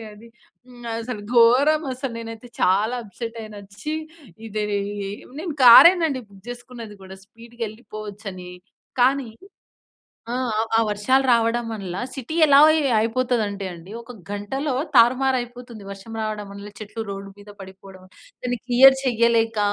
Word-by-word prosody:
Cup 225 Hz, -, -9 dB
అయిపోయింది 210 Hz, +2 st, -15 dB
వెళ్ళిపోయిందండి 230 Hz, -, -27 dB, 0.3 s
హ్మ్. 245 Hz, -1 st, -15 dB
అది 225 Hz, -, -3 dB
అసలు 225 Hz, -4 st, -6 dB
ఘోరం 265 Hz, +7 st, +5 dB
అసలు. 255 Hz, -1 st, -5 dB
నేనైతే 225 Hz, +1 st, -9 dB
చాలా 205 Hz, +6 st, +2 dB
అప్‌సెట్ 230 Hz, +2 st, -7 dB
అయిన. 215 Hz, -1 st, -11 dB, 0.2 s
ఛీ! 305 Hz, +1 st, -3 dB, 0.5 s
ఇది 215 Hz, 0 st, -3 dB, 0.2 s
ఈ 200 Hz, 0 st, -5 dB, 0.3 s
నేను 335 Hz, -4 st, -5 dB
కారే‌నండి 315 Hz, +2 st, +8 dB
బుక్ 195 Hz, -1 st, -19 dB
చేసుకున్నది 240 Hz, -3 st, -10 dB
కూడా 190 Hz, 0 st, -11 dB
స్పీడ్‌గా 230 Hz, +2 st, -13 dB
వెళ్లిపోవచ్చని. 210 Hz, -4 st, -9 dB, 0.5 s
కానీ 260 Hz, -1 st, +2 dB, 1.0 s
ఆ! -, -, -2 dB, 0.4 s
ఆ -, -, +4 dB
వర్షాలు 255 Hz, +6 st, +2 dB
రావడం 230 Hz, 0 st, +2 dB
వల్ల 195 Hz, -5 st, -6 dB, 0.2 s
సిటీ 270 Hz, +4 st, -6 dB
ఎలా 280 Hz, -1 st, +6 dB
అయి 315 Hz, -1 st, +3 dB, 0.2 s
అయిపోతుందంటే 225 Hz, -4 st, -1 dB
అండి 175 Hz, +3 st, -12 dB
ఒక 235 Hz, +1 st, -12 dB, 0.2 s
గంటలో 260 Hz, +8 st, -3 dB, 0.2 s
తారుమారు 255 Hz, +2 st, +4 dB
అయిపోతుంది. 240 Hz, -3 st, -9 dB
వర్షం 200 Hz, +3 st, -10 dB
రావడం 215 Hz, -1 st, -4 dB
వల్ల 200 Hz, +1 st, -9 dB
చెట్లు 215 Hz, +1 st, -7 dB
రోడ్డు 195 Hz, 0 st, -7 dB
మీద 205 Hz, 0 st, -15 dB
పడిపోవడం. 190 Hz, 0 st, -13 dB, 0.4 s
దాన్ని 245 Hz, -1 st, -1 dB
క్లియర్ 265 Hz, +2 st, +7 dB
చేయలేక 230 Hz, -3 st, +2 dB
230 Hz, 145 wpm, -22 LUFS, 205-250 Hz, 1.0 s, కారే‌నండి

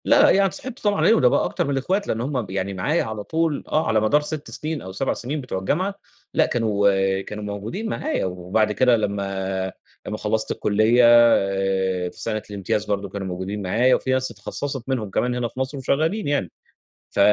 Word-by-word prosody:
لأ -, -, +6 dB
يعني 195 Hz, 0 st, +4 dB
اتصاحبت 250 Hz, +6 st, -7 dB
طبعًا 205 Hz, -1 st, +2 dB
عليه، -, -, +5 dB
وده 220 Hz, -, +4 dB
بقى -, -, +2 dB
أكتر -, -, -1 dB
من 140 Hz, -, -2 dB
الأخوات 185 Hz, +10 st, 0 dB
لإن 115 Hz, -, -1 dB
هُم 130 Hz, 0 st, -1 dB
ب 105 Hz, -, -9 dB
يعني 95 Hz, 0 st, -2 dB
معايا 145 Hz, -, 0 dB
على 110 Hz, -1 st, -5 dB
طول، 160 Hz, +2 st, -1 dB
آه 155 Hz, -, +1 dB
على 110 Hz, -, +3 dB
مدار 125 Hz, +8 st, +3 dB
6 150 Hz, 0 st, -5 dB
سنين 155 Hz, 0 st, -4 dB
أو 95 Hz, -, -8 dB
7 95 Hz, -, -1 dB
سنين 140 Hz, +5 st, -4 dB
بتوع 125 Hz, -7 st, -4 dB
الجامعة، 185 Hz, -, -1 dB, 0.4 s
لأ -, -, +4 dB
كانوا 100 Hz, -4 st, +1 dB
كانوا 105 Hz, +2 st, -7 dB
موجودين 105 Hz, -, -4 dB
معايا، 305 Hz, -, -1 dB
وبعد 95 Hz, +4 st, 0 dB
كده 125 Hz, +2 st, +4 dB
لمّا 95 Hz, -2 st, -2 dB, 0.4 s
لمّا 105 Hz, -, -3 dB
خلّصت 110 Hz, +1 st, -1 dB
الكلية 110 Hz, +4 st, +3 dB
آآ 95 Hz, -5 st, +3 dB
في -, -, -14 dB
سنة 110 Hz, -1 st, -2 dB
الامتياز 100 Hz, +1 st, -2 dB
برضو 100 Hz, -1 st, -2 dB
كانوا 95 Hz, 0 st, -5 dB
موجودين 95 Hz, +3 st, -4 dB
معايا، 115 Hz, +7 st, +3 dB
وفي 130 Hz, -, -2 dB
ناس 130 Hz, -1 st, +1 dB
اتخصّصت 135 Hz, +5 st, -5 dB
منهم 115 Hz, -6 st, -1 dB
كمان 125 Hz, +5 st, 0 dB
هنا 125 Hz, -1 st, -1 dB
في 125 Hz, -, -10 dB
مصر 130 Hz, +2 st, -2 dB
وشغّالين 155 Hz, +10 st, 0 dB
يعني، 140 Hz, -, 0 dB, 0.6 s
ف -, -, -4 dB
110 Hz, 195 wpm, -23 LUFS, 100-140 Hz, 0.6 s, لأ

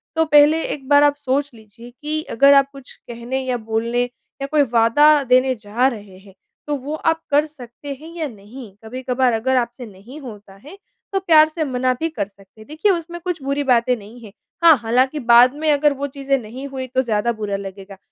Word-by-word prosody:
तो 320 Hz, 0 st, +2 dB
पहले 300 Hz, +1 st, +4 dB
एक 270 Hz, -3 st, -10 dB
बार 285 Hz, 0 st, +6 dB
आप 290 Hz, 0 st, +3 dB
सोच 285 Hz, +1 st, -2 dB
लीजिए 230 Hz, +2 st, -15 dB
कि 305 Hz, +1 st, -3 dB, 0.2 s
अगर 280 Hz, +2 st, +6 dB
आप 275 Hz, -1 st, +4 dB
कुछ 275 Hz, -2 st, -13 dB
कहने 240 Hz, +3 st, -6 dB
या 250 Hz, -1 st, -1 dB
बोलने 230 Hz, +2 st, -2 dB, 0.4 s
या 275 Hz, -, -3 dB
कोई 305 Hz, -1 st, +3 dB
वादा 230 Hz, +7 st, +5 dB
देने 255 Hz, +1 st, +2 dB
जा 225 Hz, +5 st, 0 dB
रहे 205 Hz, -6 st, -7 dB
हैं, 195 Hz, 0 st, -18 dB, 0.3 s
तो 295 Hz, -, -1 dB
वो 280 Hz, +4 st, -6 dB
आप 325 Hz, +1 st, -1 dB
कर 290 Hz, +2 st, +3 dB
सकते 280 Hz, -1 st, -10 dB
हैं 325 Hz, +2 st, -11 dB
या 320 Hz, -3 st, -3 dB
नहीं? 215 Hz, 0 st, -13 dB
कभी-कभार 250 Hz, +1 st, -1 dB
अगर 260 Hz, +4 st, 0 dB
आपसे 240 Hz, 0 st, -3 dB
नहीं 215 Hz, +8 st, -13 dB
होता 210 Hz, -6 st, -11 dB
है, 295 Hz, -, -14 dB, 0.4 s
तो 390 Hz, -, +1 dB
प्यार 320 Hz, -5 st, +5 dB
से 315 Hz, 0 st, -3 dB
मना 255 Hz, -2 st, 0 dB
भी 325 Hz, -, -1 dB
कर 210 Hz, -11 st, -4 dB
सकते 200 Hz, +1 st, -21 dB
हैं। -, -, -15 dB
देखिए, 315 Hz, +7 st, 0 dB
उसमें 345 Hz, 0 st, -4 dB
कुछ 355 Hz, -4 st, -4 dB
बुरी 280 Hz, +1 st, -1 dB
बातें 250 Hz, -2 st, +2 dB
नहीं 215 Hz, +3 st, -13 dB
हैं। 205 Hz, -, -12 dB, 0.3 s
हाँ, 330 Hz, -2 st, +8 dB
हालाँकि 255 Hz, +5 st, 0 dB
बाद 240 Hz, 0 st, +5 dB
में 310 Hz, 0 st, 0 dB
अगर 290 Hz, 0 st, +2 dB
वो 280 Hz, +1 st, -4 dB
चीज़ें 275 Hz, 0 st, -2 dB
नहीं 255 Hz, +5 st, -9 dB
हुईं, 260 Hz, -1 st, -6 dB
तो 260 Hz, -, +4 dB
ज़्यादा 235 Hz, -1 st, -1 dB
बुरा 210 Hz, -3 st, -4 dB
लगेगा। 195 Hz, 0 st, -10 dB
260 Hz, 210 wpm, -20 LUFS, 230-290 Hz, 0.4 s, हाँ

